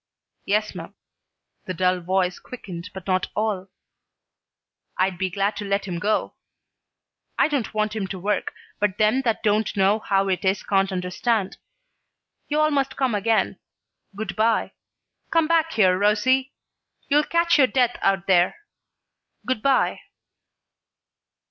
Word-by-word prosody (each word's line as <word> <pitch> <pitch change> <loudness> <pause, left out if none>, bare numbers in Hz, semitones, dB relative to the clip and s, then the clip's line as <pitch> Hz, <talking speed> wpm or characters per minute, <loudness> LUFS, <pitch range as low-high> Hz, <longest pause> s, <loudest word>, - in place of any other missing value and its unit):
"Yes 210 +1 0
'm." - - -9 0.7
The 185 - -4
dull 185 +1 +1
voice 180 +1 0
quickened 190 -7 -9
not 190 -1 -9
at 185 -1 0
all. 210 -3 -1 1.3
"I'd 185 -1 0
be 190 -1 0
glad 200 +3 -1
to 210 - -4
let 200 0 -1
him 175 -3 -4
go. 210 +4 0 1.0
I - - +4
don't 285 -7 -2
want 215 0 0
him 200 -3 -2
to 190 - -6
work, 200 +2 -1 0.3
but 205 -2 0
them 215 +5 +3
that 230 -4 -1
don't 215 0 +1
know 195 +3 +3
how 195 -2 +1
it 185 -2 -1
is 190 +1 +1
can't 195 -1 +1
understand. 190 +3 -1 0.9
You 300 +1 0
all 305 0 +3
must 275 -2 -1
come 265 -4 +1
again. 215 +2 +1 0.6
Good 205 -1 -5
by. 220 +1 +1 0.6
Come 330 -1 +3
back 325 0 +2
here, 185 -4 +4
Rosie. 255 +6 +2 0.5
You'll 295 +1 +4
catch 335 0 +2
your 260 - +6
death 250 -2 +1
out 195 0 +1
there. 180 -1 +3 0.9
Good 255 -4 -1
by." 275 +1 +2
210 Hz, 140 wpm, -23 LUFS, 190-245 Hz, 1.3 s, your